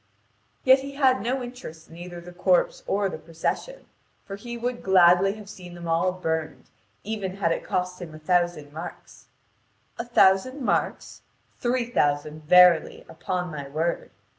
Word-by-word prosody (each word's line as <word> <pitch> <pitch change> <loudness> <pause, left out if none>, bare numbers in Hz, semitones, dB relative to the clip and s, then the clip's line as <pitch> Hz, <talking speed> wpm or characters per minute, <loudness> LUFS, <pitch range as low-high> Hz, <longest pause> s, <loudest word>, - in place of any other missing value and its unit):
Yet 260 +1 +6
he 275 +1 -7
had 260 -5 +3
no 250 +4 -2
interest 240 -11 -10
in 165 - -14
either 175 0 -8
the 175 +1 -11
corpse - - +1
or 200 0 +1
the 160 -4 -6
procession, 165 - -4 0.4
for 195 - -6
he 235 +4 -7
would 240 +1 -3
gladly 190 +1 +5
have 210 -2 -11
seen 180 -3 -11
them 170 -1 -8
all 165 +3 +2
burned, 160 -6 -4 0.3
even 200 -3 -4
had 190 -4 0
it - - -2
cost 180 0 -3
him 160 -3 -8
a - - -8
thousand 175 -2 0
marks. 165 +3 -10 0.7
A - - -1
thousand 240 +3 +3
marks? - - -2 0.4
Three 245 -1 0
thousand, 150 -3 0
verily, 180 -1 +5
upon 180 +1 -4
my 145 -2 -7
word. 160 +4 -2
180 Hz, 160 wpm, -25 LUFS, 165-235 Hz, 0.7 s, Yet